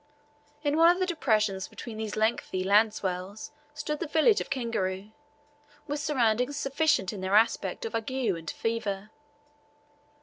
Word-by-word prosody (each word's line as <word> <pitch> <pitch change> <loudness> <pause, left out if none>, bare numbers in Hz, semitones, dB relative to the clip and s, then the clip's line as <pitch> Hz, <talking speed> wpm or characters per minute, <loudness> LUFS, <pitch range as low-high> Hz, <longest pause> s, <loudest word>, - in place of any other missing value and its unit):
In 290 0 +1
one 330 +1 +7
of 350 - +4
the 370 - +1
depressions 215 - 0
between 230 -3 -8
these 220 -1 -4
lengthy 215 -4 0
land 210 +3 +5
swells 190 +1 -5 0.2
stood 300 0 -3
the 340 - -3
village 320 +8 +4
of - - -6
Kingaru, 215 -7 -2 0.7
with 290 0 -3
surroundings 255 -2 +1
significant 275 - +1
in 200 - -6
their 190 +2 0
aspect 230 - +2
of 455 - -5
ague 225 +1 -2
and 200 -12 -1
fever. 215 -3 -3
225 Hz, 145 wpm, -28 LUFS, 200-290 Hz, 0.7 s, one